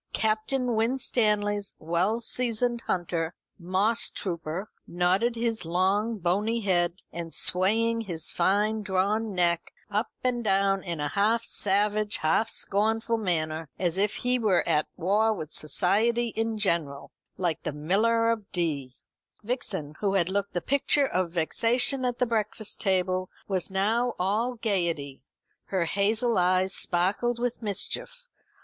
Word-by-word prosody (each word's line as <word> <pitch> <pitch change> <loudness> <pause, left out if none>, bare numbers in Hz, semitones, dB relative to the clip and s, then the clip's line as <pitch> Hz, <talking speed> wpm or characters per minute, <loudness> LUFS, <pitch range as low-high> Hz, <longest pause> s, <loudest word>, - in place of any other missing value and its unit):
Captain 230 +4 0
Winstanley's 210 -4 +1
well 175 +8 0
seasoned 240 0 0
hunter, 170 -2 -1 0.3
Mosstrooper, 185 -3 0 0.2
nodding 185 +7 +1
his 230 -2 -1
long 190 +6 +1
bony 205 +6 0
head, 175 -3 +1 0.2
and 170 -1 -6
swaying 225 +8 +2
his 170 -7 -1
fine 210 +5 +1
drawn 205 +2 0
neck 170 -1 +1 0.2
up 210 +4 0
and 245 -2 0
down 195 -1 +2
in 170 -4 -4
a 145 0 -1
half 220 +6 +2
savage 210 +1 +1
half 160 +8 +1
scornful 225 +3 0
manner, 160 -5 -2
as 175 -2 0
if 200 +2 +1
he 250 0 0
were 205 -6 +2
at 150 - +2
war 205 +6 +2
with 160 -6 -6
society 225 +9 +2
in 225 0 -2
general, 165 -9 -1 0.3
like 175 -4 -1
the - - -3
Miller 220 +10 +2
of 220 -3 -4
Dee. 145 -8 -2 0.5
Vixen, 205 - -2
who 200 -2 0
had 180 -2 +2
looked 200 +1 -2
the 175 - -1
picture 280 - +2
of 185 -8 -1
vexation 240 - +1
at 245 -1 -1
the 250 - +2
breakfast 220 -2 -1
table, 185 -1 0 0.2
was 190 -2 -1
now 220 +6 +1
all 215 +7 0
gaiety. 170 - -2 0.4
Her 185 -3 0
hazel 215 +5 +1
eyes 185 +1 +2
sparkled 200 +7 0
with 245 0 -2
mischief. 485 - -3
200 Hz, 135 wpm, -27 LUFS, 175-225 Hz, 0.5 s, swaying